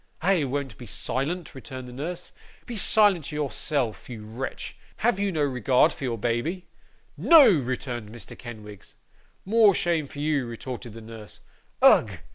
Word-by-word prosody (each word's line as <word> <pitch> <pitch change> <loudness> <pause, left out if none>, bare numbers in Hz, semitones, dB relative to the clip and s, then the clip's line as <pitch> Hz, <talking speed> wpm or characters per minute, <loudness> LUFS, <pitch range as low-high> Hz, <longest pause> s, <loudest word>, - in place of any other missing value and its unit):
'I 180 -4 +3
won't 135 -4 -4
be 120 - -9
silent,' 155 - -2
returned 130 -1 -8
the 125 - -10
nurse. 170 +7 -6 0.3
'Be 240 - -6
silent 200 -6 +3
yourself, 145 -5 -2
you 110 -3 -8
wretch. 115 +5 -6 0.2
Have 225 -3 +1
you 200 -1 0
no 155 -4 0
regard 130 -2 +3
for 135 - -6
your 120 -2 -2
baby?' 120 - -2 0.5
'No!' 325 -4 +8
returned 125 - -2
Mr. 115 -2 -10
Kenwigs. 105 -4 -11 0.5
'More 210 -1 +5
shame 165 -4 0
for 145 - -13
you,' 145 -3 0
retorted 120 0 -7
the 115 - -10
nurse. 110 -1 -11 0.4
'Ugh! - - +7
135 Hz, 150 wpm, -26 LUFS, 120-170 Hz, 0.5 s, No